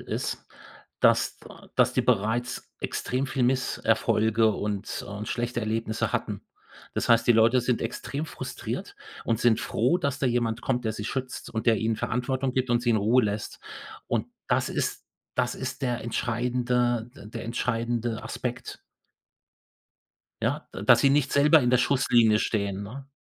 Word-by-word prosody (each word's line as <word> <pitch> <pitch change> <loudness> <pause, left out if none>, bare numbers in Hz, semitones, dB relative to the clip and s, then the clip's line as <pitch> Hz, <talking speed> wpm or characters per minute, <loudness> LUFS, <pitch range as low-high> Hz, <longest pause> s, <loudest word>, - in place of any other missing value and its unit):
ist, - - -4 0.5
dass - - +3
da - - -14
dass - - +4
die - - +2
bereits 120 +1 0
extrem 130 +2 -2
viel 130 -1 -1
Misserfolge 115 -3 +2
und, 105 0 -3
äh - - -9
und 100 +2 -6
schlechte 120 -1 -2
Erlebnisse 110 0 -1
hatten. - - -3 0.5
Das - - -1
heißt, 115 0 +5
die 120 - +7
Leute 115 +3 +5
sind 125 -1 0
extrem 145 +3 -4
frustriert - - -6 0.3
und 115 - +1
sind 115 -2 +3
froh, 130 +11 +1
dass 140 -4 -1
da 135 - +1
jemand 120 -1 0
kommt, 125 -2 -1
der 110 - 0
sie 105 -1 -6
schützt 130 +2 -4
und 110 - -4
der 115 -2 +5
ihnen 110 0 0
Verantwortung 130 +2 -1
gibt 130 0 0
und 120 - +3
sie 120 - +2
in 110 - +4
Ruhe 115 +5 +3
lässt 105 0 -4 0.5
und - - -1 0.2
das - - +2
ist - - -2 0.3
das 125 -1 +1
ist 130 +1 -5
der 120 -2 0
entscheidende 120 0 0
d 105 - -12
der 110 - -7
entscheidende 115 0 -1
Aspekt - - -5 1.6
ja, - - -1
da - - -6
dass - - +6
sie 135 - +5
nicht 140 -1 +2
selber 150 +2 +6
in 125 -1 +1
der 125 - +4
Schusslinie 120 -5 +4
stehen, 100 -3 -1
ne? 135 +7 -8
120 Hz, 165 wpm, -27 LUFS, 110-125 Hz, 1.6 s, die